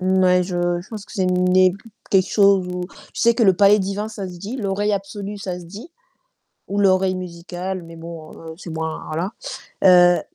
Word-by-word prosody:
Ouais, 185 -1 +3
je 175 -1 -1
je - - -18
pense 215 -3 -7
que - - -15
c'est 195 -5 0
le 185 - +1
nez 180 0 +4 0.4
quelque 190 -1 +3
chose 200 -3 +4
où 180 0 -4 0.3
je - - -4
sais 235 0 +4
que 230 - +2
le 190 - +6
palais 205 +2 +5
divin, 200 +2 -2
ça 210 -3 -6
se 180 - -10
dit, 210 +8 -6
l'oreille 205 -1 -1
absolue, 200 +1 -4
ça 185 -2 -5
se 175 - -11
dit. 205 - -10 0.8
Ou 200 +1 -2
l'oreille 190 -1 +3
musicale, 180 +1 -6
mais 165 0 -12
bon, 165 -1 -9
heu, 160 -1 -10
c'est 180 - -9
moins 160 0 -4
voilà, 170 +7 -3 0.5
heu 175 -2 +7
185 Hz, 205 wpm, -21 LUFS, 175-200 Hz, 0.8 s, heu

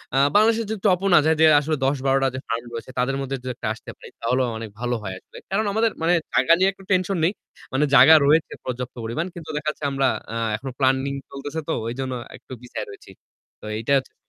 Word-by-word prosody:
আ - - +3 0.2
বাংলাদেশের 225 +2 +4
যদি 220 -1 -3
top 180 -2 +3
ও - - +3
না - - +8
যাই 160 0 +3
যে - - +8
আসলে 155 +2 -1
১০-১২ 135 0 +1
টা - - +4
যে - - -3
ফার্ম 115 0 -2
রয়েছে, 115 +2 -7
তাদের 130 +2 +1
মধ্যে 135 0 -3
যদি 130 0 -4
একটা - - -5
আসতে 110 - -11
পারি, - - -12
তাহলেও 125 +2 +1
অনেক 110 -1 -6
ভালো 120 0 -1
হয় 95 -2 -4
আসলে, - - -16
কারণ 215 +3 +1
আমাদের 225 +1 +2
মানে 165 +2 +3 0.2
জায়গা 130 +6 +5
নিয়ে 190 +1 +4
একটু 195 - -17
tension 185 +1 +1
নেই। 175 - +3 0.4
মানে 140 +3 +2
জায়গা 160 - +9
রয়েছে 155 +3 +3
পর্যাপ্ত 125 0 -5
পরিমাণ। 115 +9 -2
কিন্তু 165 -2 -9
দেখা 150 +1 -1
যাচ্ছে 150 - -7
আমরা 135 0 +1 0.3
আ - - -4 0.2
এখনো 130 +5 -6
planning 135 +1 +1
চলতেছে 145 +3 -6
তো 160 - 0
ওইজন্য 130 +2 -3 0.2
একটু - - -22
পিছায় 120 -3 -6
রয়েছি। 100 -1 -13 0.5
তো - - -11
এইটা 115 +5 -3
হচ্ছে 135 - -5
135 Hz, 225 wpm, -23 LUFS, 125-165 Hz, 0.5 s, জায়গা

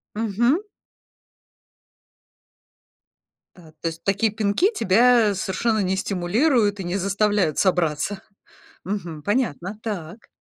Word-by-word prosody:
Мгм. 235 - +1 2.9
Да, 160 -3 -17
то 165 - -1
есть 165 0 -6
такие 200 +2 +1
пинки 215 - +1
тебя 230 - +4
совершенно 215 +4 -1
не 190 -1 0
стимулируют 205 - +1
и - - -3
не 175 +2 -2
заставляют 200 -4 +1
собраться. 180 +1 0 0.6
Мгм, 175 -6 -5
понятно. 205 - -2
Так. 200 -2 -6
200 Hz, 100 wpm, -23 LUFS, 180-220 Hz, 2.9 s, тебя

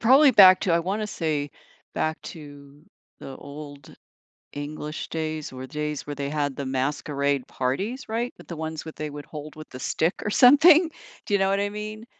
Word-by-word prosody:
probably 265 +5 +7
back 190 -5 +8
to 180 - +1
I 165 - +4
wanna 195 +5 -2
say, 155 -7 -2 0.4
back 155 0 -1
to 145 -1 -12 0.3
the 135 - -9
Old 145 -1 -11 0.6
English 150 +1 -6
days, 155 -1 -4
or 130 0 -7
days 150 +1 -4
where 145 - -5
they 140 0 -3
had 145 -2 -1
the 140 - -4
masquerade 140 +1 -1
parties, 195 - -3
right? 235 +3 -2
With - - -15
the 170 - -6
ones 160 0 -5
with 160 - -8
they 155 0 -4
would 145 0 -8
hold 150 0 -9
with 155 0 -11
the 130 - -9
stick 165 +6 0
or - - -1
something. 305 - +7 0.4
Do - - -3
you 200 - +4
know 195 0 +2
what 195 0 +1
I 205 0 0
mean, 215 +1 -7
155 Hz, 190 wpm, -25 LUFS, 145-200 Hz, 0.6 s, back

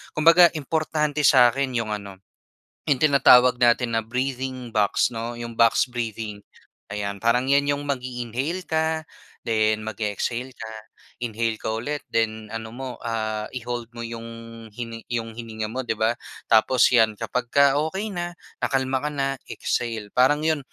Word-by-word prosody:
kumbaga 165 +3 +7
importante 150 0 -1
sa 125 -2 +7
akin 135 -1 -2
yung 110 -2 -3
ano, 100 -2 -9 0.7
yung 140 - +4
tinatawag 125 -4 +6
natin 120 0 +3
na 115 - +2
breathing 130 0 -3
box 105 +2 +2
'no, 115 +1 -4
yung 120 0 -6
box 115 -1 +5
breathing, 110 -3 -4 0.6
ayan 100 -1 -3
parang 120 +2 +2
'yan 140 0 +3
yung 145 - -6
mag-iinhale 130 +5 -3
ka 160 0 0 0.4
then 110 -1 +2
mag-e-exhale 110 +4 -3
ka, 110 -3 -9 0.5
inhale 115 -1 -1
ka 110 - -4
ulit 135 +7 -3
then 110 -1 -1
ano 110 0 -5
mo 130 +1 -5
ah, 110 -2 -2
i-hold 120 -1 -4
mo 115 - -5
yung 115 0 -6 0.4
hini 115 +1 -8
yung 115 -1 -3
hininga 110 -2 -5
mo 130 - -4
'di 115 -3 -2
ba, 110 +1 +2 0.4
tapos 115 +3 +5
'yan 110 -3 +4
kapag 125 +3 -3
ka 140 0 +5
okey 200 +5 -4
na, 175 -2 -4 0.3
nakalma 130 -1 0
ka - - -1
na 140 -2 -1 0.2
exhale, 115 -4 -3
parang 145 +4 +3
yun 160 -1 +2
120 Hz, 155 wpm, -24 LUFS, 110-135 Hz, 0.7 s, kumbaga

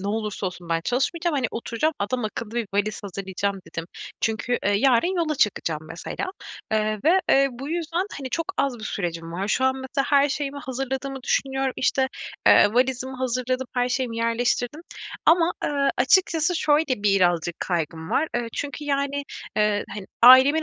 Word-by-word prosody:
"Ne 200 - -3
olursa 210 -2 -2
olsun 180 -2 -7
ben 165 0 +1
çalışmayacağım. 305 +6 0
Hani, 255 -3 +1
oturacağım 235 +7 -1
adam 240 +3 -2
akıllı 215 +1 -5
bir 235 -2 -1
valiz 210 +1 0
hazırlayacağım." 195 0 -3
dedim. 165 - -5 0.4
Çünkü, 225 +2 0
eee, 205 - +3
yarın 260 - +3
yola 320 -3 0
çıkacağım 170 - 0
mesela, 165 - -5 0.5
eee, 215 0 +1
ve 365 +4 +5
eee 275 0 +5
bu 270 +4 -7
yüzden, 340 +3 -1
hani, 260 -2 -6
çok 330 - -1
az 260 -4 0
bir 215 - -8
sürecim 170 -4 -4
var. 195 +4 -3
Şu 260 - +1
an 260 0 +3
mesela 265 +1 -2
her 285 0 +5
şeyimi 285 0 -3
hazırladığımı 265 0 -4
düşünüyorum 270 0 0
işte, 265 0 +1 0.4
eee, 205 +2 +6
valizimi 260 +1 0
hazırladım, 255 0 -1
her 245 0 +1
şeyimi 250 -2 -2
yerleştirdim 240 +5 0 0.5
ama, 335 +1 +5
ııı, 280 -1 +1
açıkçası 330 +4 +3
şöyle 295 -8 +1
birazcık 175 -4 +2
kaygım 160 -2 -3
var. 315 - +1
Iıı, 235 -1 -2
çünkü 290 +1 -4
yani, 280 0 -1 0.3
ııı, 210 -1 +2
hani 200 -2 -7 0.2
ailemin 260 +6 +8
250 Hz, 165 wpm, -24 LUFS, 210-280 Hz, 0.5 s, ailemin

